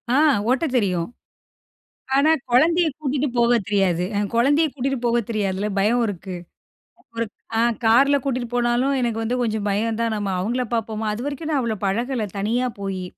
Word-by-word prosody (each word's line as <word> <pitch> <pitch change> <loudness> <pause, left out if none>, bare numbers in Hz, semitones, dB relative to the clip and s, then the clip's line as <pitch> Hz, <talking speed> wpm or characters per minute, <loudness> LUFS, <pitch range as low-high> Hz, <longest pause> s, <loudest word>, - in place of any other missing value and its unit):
ஆ. - - +4 0.3
ஓட்டத் 265 +1 +1
தெரியும். 180 -4 0 1.1
ஆனா, 295 +3 +4 0.2
கொழந்தைய 330 +6 +4
கூட்டிட்டு 285 0 -1
போக 235 0 +4
தெரியாது 190 -4 +1
என் 205 -1 -1
கொழந்தைய 290 +7 +3
கூட்டிட்டு 270 0 -2
போக 240 0 +2
தெரியாதுல! 205 -2 -1
பயம் 235 +5 +2
இருக்கு. 185 -1 -6 0.8
ஒரு 230 - 0 0.3
அ. - - +4 0.2
கார்ல 270 +6 +5
கூட்டிட்டு 250 -3 -2
போனாலும், 245 +3 +1
எனக்கு 230 -2 -1
வந்து 235 +3 -1
கொஞ்சம் 215 -2 -1
பயம் 220 +3 -1
தான். 230 -1 0
நம்ம 205 -1 -2
அவுங்கள 240 +6 -1
பாப்போமா! 220 -1 -2
அதுவரைக்கும், 285 +7 -4
நான் 280 - +2
அவ்ளோ, 220 -3 -2
பழகல 230 +2 -1
தனியா 240 +5 0
போயி. 195 -2 -4
235 Hz, 155 wpm, -22 LUFS, 210-265 Hz, 1.1 s, கார்ல